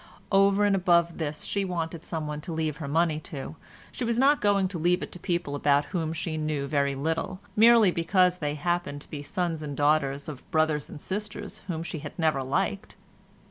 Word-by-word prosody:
Over 195 +1 +4
and 200 -1 +3
above 170 -2 +2
this 150 -2 -3
she 200 - -1
wanted 170 -3 -3
someone 150 -2 -4
to 170 - -7
leave 160 -2 -2
her 155 - -5
money 160 +1 +1
to; 145 0 -7 0.4
she - - -5
was 235 -1 0
not 280 +3 +4
going 200 -2 +3
to 180 -3 -4
leave 175 +3 +2
it - - -7
to 180 - -9
people 175 -5 -2
about 145 0 +2
whom 165 -3 -1
she 165 0 -3
knew 155 -2 -1
very 140 -1 0
little, 165 +6 -2 0.2
merely 225 -2 +7
because 180 +1 +2
they 150 -1 -2
happened 175 -2 -2
to - - -15
be 150 - -5
sons 165 +1 -2
and 145 -2 -5
daughters 145 -1 +2
of 150 +3 -9
brothers 155 -4 +1
and - - -9
sisters 205 +6 -5
whom 165 -3 -3
she 165 -2 -5
had 150 0 -9
never 155 -5 +1
liked. 195 +9 -2
165 Hz, 200 wpm, -27 LUFS, 150-185 Hz, 0.4 s, merely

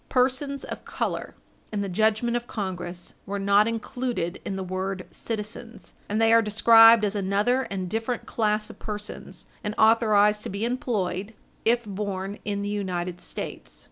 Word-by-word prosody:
Persons 270 +2 +1
of - - -7
color, - - -3 0.4
in 210 -2 -1
the 200 - -2
judgment 220 +5 +1
of 240 0 -2
Congress, 180 -4 -5
were 200 +1 -2
not 200 +2 +4
included 230 -5 -3
in 195 - -3
the 190 - -3
word 185 0 -3
citizens, 225 +1 -6 0.2
and 210 +2 0
they 225 0 +5
are 230 - +7
described 225 +1 +7
as 205 - -1
another 205 +6 +1
and 190 -2 -3
different 225 +5 -2
class 215 -1 0
of - - -17
persons, 210 -1 -6 0.2
and 210 0 -3
authorized 215 -2 +4
to - - -6
be 200 +3 -2
employed, 215 -5 -2 0.3
if 235 +1 +3
born 200 -1 -4
in 200 -1 -2
the 205 - -2
United 180 -3 -3
States. - - -6
210 Hz, 160 wpm, -26 LUFS, 195-230 Hz, 0.4 s, are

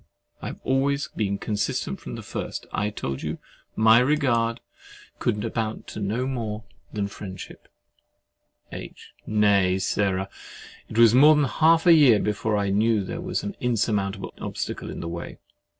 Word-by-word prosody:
I - - -5
have - - -7
always 140 +2 0
been 100 -2 -2
consistent 105 0 -2
from - - -7
the - - -8
first. - - -5
I 105 - 0
told 70 -9 -5
you 80 +1 -4 0.4
my 110 +1 +6
regard 125 -4 +1 0.6
could 105 +2 -1
amount 110 -1 -3
to - - -7
no 110 +5 -1
more 115 -5 -4 0.3
than 105 -1 -2
friendship. 95 -2 -9 1.0
H. - - -10
Nay, 100 -3 +3
Sarah, 95 0 0 0.6
it 110 - -6
was 115 -1 +7
more 150 +5 +7
than 150 - +3
half 160 +4 +3
a 175 - +8
year 140 -9 +7
before 105 +1 -1
I 100 -1 0
knew 110 +1 +2
that - - -5
there 170 - -4
was 180 0 -3
an 205 - -5
insurmountable 105 -5 -1
obstacle - - -5
in - - -6
the 85 - -5
way. 85 0 -6
110 Hz, 160 wpm, -25 LUFS, 100-130 Hz, 1.0 s, a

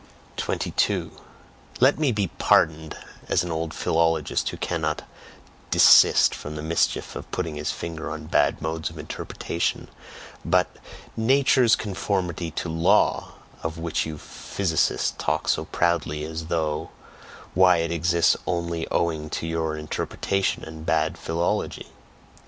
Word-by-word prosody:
22. - - -1 0.7
Let 135 +4 +4
me 150 -4 +2
be 105 -5 -1
pardoned, 80 -1 +2 0.3
as 85 - +2
an 90 - -4
old 80 0 -2
philologist 80 -2 +1
who - - -7
cannot - - -2 0.7
desist - - +7
from 75 +1 -7
the 75 - -5
mischief 80 +1 0
of - - -7
putting 85 -4 -3
his 75 0 -3
finger 80 -1 -5
on - - -6
bad - - +1
modes 80 0 -2
of 80 - -12
interpretation, 80 +2 -3 0.5
but - - +3 0.5
"Nature's 130 0 +4
conformity 95 -4 -2
to 80 - -4
law," 85 +6 +2 0.3
of 80 0 -4
which 80 -1 -1
you 80 -1 -6
physicists 85 +2 -1
talk 75 +2 -1
so - - +1
proudly, 80 -3 0
as 80 +1 -5
though 80 -3 -1 0.6
why, 90 -1 +5
it 85 0 -1
exists 85 0 +3
only 85 -2 -2
owing 80 -3 -1
to 80 - -3
your 80 -1 -2
interpretation 95 +5 -2
and 80 0 -9
bad - - +1
"philology." 85 +1 -2
80 Hz, 130 wpm, -24 LUFS, 80-90 Hz, 0.7 s, desist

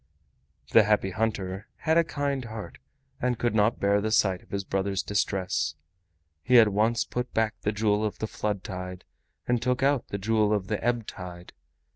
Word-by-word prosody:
The 115 - +8
Happy 105 -2 +2
Hunter 105 -3 -2
had 160 0 0
a 170 - +5
kind 145 -4 -2
heart 110 -1 -8 0.4
and 125 -2 +1
could 120 0 0
not 105 +1 +2
bear 100 +1 +3
the 110 - -1
sight 95 -4 +2
of - - -23
his 100 -1 -2
brother's 95 0 -1
distress. 90 -7 -1 0.7
He 125 +9 +5
at 110 -2 +7
once 110 +3 +2
put 125 +1 -4
back 110 -1 +2
the 105 - 0
Jewel 105 0 +1
of 105 - -2
the - - -2
Flood 105 -3 -3
Tide 90 -1 -6 0.4
and 120 -1 +1
took 125 +2 0
out 140 -2 +2
the 100 - -3
Jewel 105 +1 +2
of 100 -2 -1
the 105 - -2
Ebb 120 -1 0
Tide. 90 -2 -9
105 Hz, 185 wpm, -27 LUFS, 95-115 Hz, 0.7 s, The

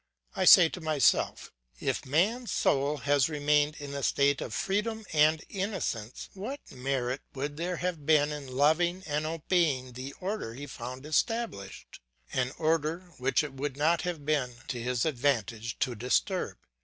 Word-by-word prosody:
I - - +1
say 175 - +9
to 180 - -7
myself: 155 -5 +2 0.3
If - - -2
man's 210 - +1
soul 140 +2 +1
had 145 +1 +2
remained 150 0 +2
in 140 -1 -7
a 140 - -3
state 140 +1 +2
of - - -5
freedom 215 +3 -1
and 155 +1 +4
innocence, 185 - -3
what 230 +9 -5
merit 130 0 -2
would 145 +2 -3
there 175 +3 -2
have 175 -4 -3
been 150 -1 +4
in 145 -2 -6
loving 160 +7 +2
and 150 0 -1
obeying 155 -6 0
the 130 +3 -7
order 185 - -4
he 140 +3 -7
found 130 0 -7
established, 155 - -2 0.3
an 130 0 0
order 165 +3 0
which 135 +4 +2
it 145 -3 -6
would 135 0 -4
not 160 +3 +2
have 170 -5 -4
been 140 -5 0
to 120 -3 -3
his 125 0 0
advantage 120 -6 -1
to 130 - 0
disturb? 125 - 0
145 Hz, 155 wpm, -29 LUFS, 130-170 Hz, 0.3 s, say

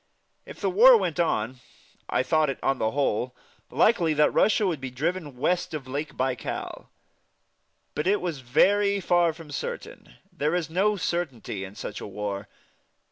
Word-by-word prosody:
If - - -10
the - - 0
war 475 +5 +8
went 170 - -2
on, 125 -7 0 0.5
I - - +1
thought 155 +3 +2
it, 135 - -3
on 135 -1 +1
the 110 - +1
whole, 125 -2 -1 0.3
likely 170 -8 +3
that 150 0 +3
Russia 215 0 +3
would 165 -7 -1
be 135 - -4
driven 150 +1 -3
west 175 +4 0
of 135 -4 -6
Lake 145 +4 -5
Baikal. 130 -3 -3 1.1
But 150 +4 -2
it 205 +2 +3
was 170 -5 -3
very 200 +11 +3
far 175 -2 +3
from 160 -2 -12
certain. 140 - -6 0.2
There 150 +4 0
is 170 -3 -2
no 200 +5 +2
certainty 135 - -3
in 95 +1 -9
such 105 - -6
a - - -6
war. 100 0 -5
150 Hz, 165 wpm, -26 LUFS, 130-175 Hz, 1.1 s, war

